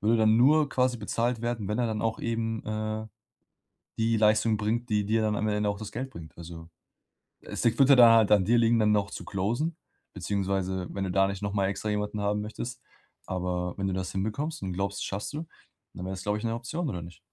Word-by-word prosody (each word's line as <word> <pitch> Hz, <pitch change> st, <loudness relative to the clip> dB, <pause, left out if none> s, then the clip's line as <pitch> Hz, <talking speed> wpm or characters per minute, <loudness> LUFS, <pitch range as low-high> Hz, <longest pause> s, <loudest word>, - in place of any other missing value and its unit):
würde 110 Hz, +3 st, +3 dB
dann 110 Hz, 0 st, +4 dB
nur 145 Hz, +4 st, +5 dB
quasi 125 Hz, -1 st, +1 dB
bezahlt 115 Hz, +2 st, -1 dB
werden, 120 Hz, -4 st, -2 dB
wenn 105 Hz, +3 st, -1 dB
er 120 Hz, -, +2 dB
dann 110 Hz, -1 st, -2 dB
auch 115 Hz, 0 st, -1 dB
eben, 115 Hz, -1 st, -2 dB
äh, 110 Hz, 0 st, -3 dB, 0.9 s
die 115 Hz, 0 st, +2 dB
Leistung 110 Hz, 0 st, +3 dB
bringt, 115 Hz, +3 st, -1 dB
die 105 Hz, -1 st, +1 dB
dir 110 Hz, +1 st, +2 dB
dann 105 Hz, -1 st, +1 dB
am 110 Hz, -, 0 dB
Ende 105 Hz, 0 st, +1 dB
auch 100 Hz, 0 st, -3 dB
das 110 Hz, -, -7 dB
Geld 130 Hz, +3 st, -4 dB
bringt. 80 Hz, -6 st, -11 dB
Also, 85 Hz, -1 st, -9 dB, 0.7 s
es -, -, -5 dB
es 115 Hz, +2 st, +2 dB
würde 135 Hz, 0 st, +7 dB
da 115 Hz, -2 st, +8 dB
halt 110 Hz, -2 st, +3 dB
an 100 Hz, -3 st, +5 dB
dir 120 Hz, +3 st, +4 dB
liegen, 115 Hz, 0 st, +4 dB
dann 105 Hz, -1 st, +3 dB
noch 100 Hz, -2 st, +1 dB
zu -, -, -7 dB
closen 120 Hz, -, -1 dB, 0.4 s
beziehungsweise 95 Hz, -1 st, -2 dB
wenn 100 Hz, -, -3 dB
du 90 Hz, -, -2 dB
da 95 Hz, +1 st, +3 dB
nicht 100 Hz, 0 st, -5 dB
noch 100 Hz, 0 st, -2 dB
mal 100 Hz, -2 st, +1 dB
extra 105 Hz, +2 st, -3 dB
jemanden 105 Hz, 0 st, -2 dB
haben 105 Hz, +1 st, 0 dB
möchtest. 120 Hz, +3 st, -6 dB, 0.5 s
Aber 90 Hz, -1 st, -2 dB
wenn 95 Hz, 0 st, -1 dB
du 95 Hz, -, -1 dB
das 95 Hz, -1 st, -3 dB
hinbekommst 110 Hz, +12 st, -3 dB
und 95 Hz, -2 st, -3 dB
glaubst, 100 Hz, +2 st, -2 dB
das -, -, -2 dB
schaffst 100 Hz, +8 st, -4 dB
du, 160 Hz, +2 st, -5 dB, 0.5 s
dann 90 Hz, -, -7 dB
wäre 95 Hz, -, -4 dB
das, 95 Hz, -, -7 dB
glaube 105 Hz, +1 st, 0 dB
ich, -, -, -9 dB
'ne 115 Hz, -, 0 dB
Option 140 Hz, +7 st, -3 dB
oder 90 Hz, -6 st, -4 dB
nicht? 85 Hz, +1 st, -11 dB
105 Hz, 230 wpm, -28 LUFS, 95-115 Hz, 0.9 s, da